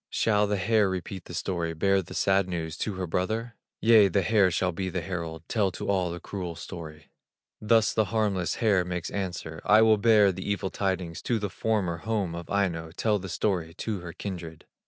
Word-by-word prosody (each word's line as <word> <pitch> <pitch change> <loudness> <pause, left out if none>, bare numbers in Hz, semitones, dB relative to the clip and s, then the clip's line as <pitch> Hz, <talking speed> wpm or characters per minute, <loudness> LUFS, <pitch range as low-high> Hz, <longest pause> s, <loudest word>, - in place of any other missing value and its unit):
Shall 105 -2 +2
the 105 0 0
hare 105 0 +2
repeat 95 0 -5
the 85 - -8
story, 85 -2 -2
Bear 95 +4 +2
the 90 - -10
sad 95 -1 +2
news 80 -3 -3
to 105 +1 -3
her 90 0 -3
brother? 110 +8 -2 0.3
Yea, 110 -2 +7
the 95 +1 +1
hare 100 0 +4
shall 90 +1 0
be 95 +2 -3
the 90 -1 -3
herald, 85 -3 -5
Tell 105 -4 +1
to - - -5
all 95 -3 +1
the 85 +1 -5
cruel 90 -2 -5
story. 80 -4 -9 0.5
Thus 110 0 +3
the 110 - +2
harmless 100 -5 0
hare 100 -5 +2
makes 90 -1 -4
answer: 90 -5 -4
"I 105 +1 +6
will 110 -1 +5
bear 105 -2 +5
the 95 +2 -6
evil 100 -2 -1
tidings 95 -4 -2
To 120 - 0
the 105 -3 -3
former 100 -7 -1
home 100 -1 -2
of 85 0 -7
Aino, 85 -5 0
Tell 105 -2 +1
the 95 0 -7
story 85 -4 -1
to 110 -4 -3
her 85 -1 -7
kindred." 85 -3 -7
95 Hz, 200 wpm, -27 LUFS, 85-105 Hz, 0.5 s, Yea